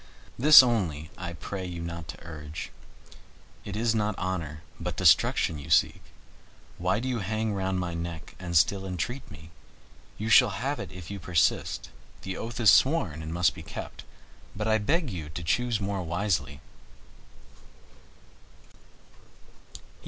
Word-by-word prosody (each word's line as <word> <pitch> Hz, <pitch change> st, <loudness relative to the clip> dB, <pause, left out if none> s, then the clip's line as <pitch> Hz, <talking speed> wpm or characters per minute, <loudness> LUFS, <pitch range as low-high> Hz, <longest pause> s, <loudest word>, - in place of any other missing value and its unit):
This 150 Hz, +2 st, +9 dB
only 85 Hz, -, -1 dB
I 85 Hz, -1 st, -6 dB
pray 95 Hz, +3 st, -6 dB
you 90 Hz, -2 st, -6 dB
not 85 Hz, -1 st, -6 dB
to -, -, -9 dB
urge. 75 Hz, -2 st, -7 dB, 0.9 s
It 100 Hz, -, -6 dB
is 115 Hz, +1 st, +1 dB
not 105 Hz, -2 st, -1 dB
honor, 85 Hz, -4 st, -4 dB, 0.2 s
but -, -, -4 dB
destruction 80 Hz, -, +3 dB
you 70 Hz, -, -10 dB
seek. -, -, +3 dB, 0.8 s
Why 90 Hz, +3 st, +1 dB
do 125 Hz, -, -4 dB
you 125 Hz, -2 st, -1 dB
hang 110 Hz, +2 st, -2 dB
round 95 Hz, -1 st, -1 dB
my 90 Hz, -1 st, -3 dB
neck 85 Hz, -1 st, -6 dB
and 90 Hz, -2 st, 0 dB
still 95 Hz, +4 st, +2 dB
entreat 120 Hz, +9 st, -4 dB
me? 80 Hz, 0 st, -13 dB, 0.7 s
You 110 Hz, -, -4 dB
shall 115 Hz, -3 st, +5 dB
have 140 Hz, +7 st, -2 dB
it 95 Hz, -, -6 dB
if 90 Hz, 0 st, -9 dB
you 100 Hz, -, -5 dB
persist, 90 Hz, -2 st, 0 dB, 0.3 s
the 95 Hz, -1 st, -4 dB
oath 115 Hz, +3 st, -6 dB
is 110 Hz, -3 st, +7 dB
sworn 110 Hz, -, +3 dB
and 80 Hz, 0 st, -6 dB
must 85 Hz, +1 st, +2 dB
be -, -, -10 dB
kept, -, -, -8 dB, 0.5 s
but 105 Hz, +2 st, -3 dB
I 110 Hz, 0 st, +3 dB
beg 145 Hz, -, 0 dB
you 80 Hz, -5 st, -6 dB
to 85 Hz, +3 st, -6 dB
choose 120 Hz, +5 st, 0 dB
more 100 Hz, -1 st, -2 dB
wisely." 85 Hz, -5 st, -2 dB
95 Hz, 150 wpm, -27 LUFS, 85-110 Hz, 0.9 s, This